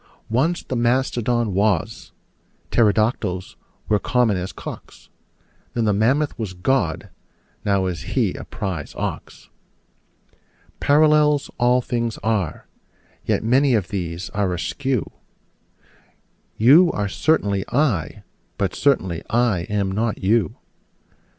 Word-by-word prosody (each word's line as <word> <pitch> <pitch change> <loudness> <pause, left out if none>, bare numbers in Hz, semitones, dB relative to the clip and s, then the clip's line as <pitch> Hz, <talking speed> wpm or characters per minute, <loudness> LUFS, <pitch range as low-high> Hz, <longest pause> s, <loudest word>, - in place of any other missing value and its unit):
Once 160 +9 +1
the 130 - -4
mastodon 120 -2 +1
was: 100 -3 0 0.6
pterodactyls 105 -4 +1 0.3
were 105 -1 +2
common 120 -3 +1
as 90 0 -4
cocks: - - -10 0.7
Then 115 -2 +1
the 105 - +2
mammoth 130 +8 +1
was 105 -5 -4
God: 90 -2 -1 0.5
now 100 -2 +1
is 90 -2 -3
He - - +2
a - - -7
prize 90 -7 -5
ox. - - -6 1.3
Parallels 150 0 +3
all 125 +1 +3
things 120 -2 -2
are: 100 -7 -1 0.6
yet - - 0
many 130 +3 +3
of 95 -6 -1
these 90 -1 -4
are 100 -2 0
askew: 130 - -2 1.5
You 150 +10 +6
are 105 -1 -1
certainly 100 -4 +1
I: 125 - 0 0.3
but 95 -3 -1
certainly 95 - +1
I 115 -7 +1
am 100 -2 0
not 110 +3 -1
you. 105 +2 +1
110 Hz, 110 wpm, -22 LUFS, 95-125 Hz, 1.5 s, You